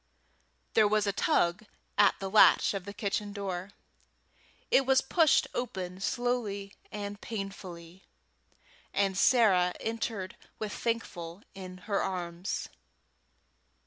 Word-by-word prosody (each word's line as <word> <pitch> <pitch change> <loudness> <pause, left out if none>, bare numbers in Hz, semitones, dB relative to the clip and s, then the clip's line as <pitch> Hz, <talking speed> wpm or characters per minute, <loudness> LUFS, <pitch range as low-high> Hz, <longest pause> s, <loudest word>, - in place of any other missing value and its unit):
There 215 -2 +5
was 215 0 +2
a 200 - 0
tug 175 +1 +1 0.3
at 205 -1 +5
the 195 - -3
latch 210 +1 +6
of 195 -2 -4
the 200 - -6
kitchen 205 0 -2
door; 190 -2 -4 1.0
it 270 - +6
was 265 0 +4
pushed 315 +3 +3
open 185 -7 -4
slowly 210 -4 -1 0.2
and 205 0 -5
painfully, 190 -4 -7 0.9
and 195 -1 +2
Sarah 190 -5 +4
entered 225 -4 -3 0.2
with 215 -1 -4
Thankful 190 -6 -3
in 185 -1 -8
her 200 -3 0
arms. 180 -1 -3
200 Hz, 110 wpm, -30 LUFS, 185-220 Hz, 1.0 s, latch